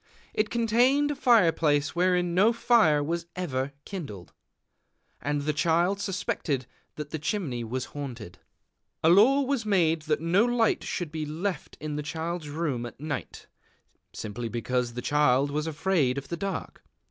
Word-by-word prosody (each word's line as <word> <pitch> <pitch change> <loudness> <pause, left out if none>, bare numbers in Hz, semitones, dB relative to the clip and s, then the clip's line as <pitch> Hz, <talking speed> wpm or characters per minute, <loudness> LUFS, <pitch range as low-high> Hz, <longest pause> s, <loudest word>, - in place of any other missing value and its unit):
It 215 0 0
contained 245 +6 +3
a - - -3
fire 235 -11 +5
place 145 -2 +1
wherein 180 -1 +2
no 205 +6 +4
fire 220 -11 +4
was 170 +3 -3
ever 140 -7 -2
kindled; 135 - -7 0.9
and 145 0 -1
the 150 +1 0
Child 170 +5 +2
suspected 165 -9 -2 0.3
that 150 -1 -7
the 160 - -3
chimney 150 - -2
was 125 +3 -3
haunted. 120 -10 -7 0.6
A 160 - +5
law 230 +11 +6
was 270 -3 -1
made 170 -6 +2
that 150 - +2
no 170 +6 +3
light 240 -2 +2
should 175 -4 -4
be 155 -1 -3
left 170 +2 -4
in 150 -1 -4
the - - -2
Child's 160 +1 -4
Room 145 -6 -2
at 120 - -13
night, 150 -1 -5 0.7
simply 115 +2 -5
because 120 +1 -1
the 125 - -4
Child 145 -1 +3
was 150 +2 -2
afraid 155 -5 +1
of 140 0 -6
the 170 - -3
dark. 195 +3 -5
160 Hz, 160 wpm, -27 LUFS, 145-195 Hz, 0.9 s, law